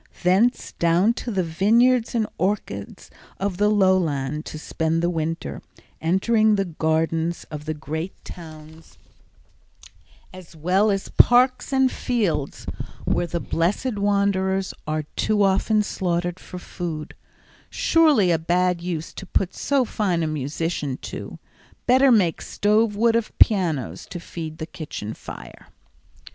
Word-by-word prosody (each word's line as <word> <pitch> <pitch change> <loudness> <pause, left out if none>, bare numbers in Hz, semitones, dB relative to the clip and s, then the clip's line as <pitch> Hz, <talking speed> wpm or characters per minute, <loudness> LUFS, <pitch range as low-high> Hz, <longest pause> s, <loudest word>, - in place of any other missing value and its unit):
Thence 195 +8 +2
down 170 +7 +3
to - - -5
the 195 -5 0
vineyards 225 +9 +3
and 225 -2 +2
orchards 180 - -3 0.3
of 195 -2 -2
the 210 +1 +3
lowlands 165 -8 +1
to - - -7
spend 160 +2 -1
the 175 - +2
winter; 160 - -3 0.4
entering 215 +6 +3
the 195 -1 0
gardens 160 0 -1
of 150 -1 -6
the 155 0 -3
great 160 +4 -5
towns 160 -1 -12 1.4
as 185 -3 -12
well 185 +7 +2
as 195 -1 -1
parks 255 +2 +4
and 265 -1 +3
fields, 185 - -2 0.4
where 175 - 0
the 170 0 -2
blessed 205 +9 -1
wanderers 195 -1 +1
are 155 0 -1
too 210 -1 +2
often 200 +2 +2
slaughtered 175 -2 -2
for 180 - -9
food—surely 180 - -1
a 165 - +2
bad 180 +1 +1
use 170 -2 -4
to - - -9
put 190 -1 0
so 275 -3 +1
fine 185 -7 -1
a - - 0
musician 150 -1 -3
to; - - -7 0.5
better 260 +2 +5
make 190 -8 +3
stove 210 +1 +1
wood 230 +2 +3
of 230 -1 -2
pianos 155 - +2
to 175 - -7
feed 160 -2 -7
the 160 - -5
kitchen 150 - -7
fire. - - -11
180 Hz, 130 wpm, -23 LUFS, 160-210 Hz, 1.4 s, better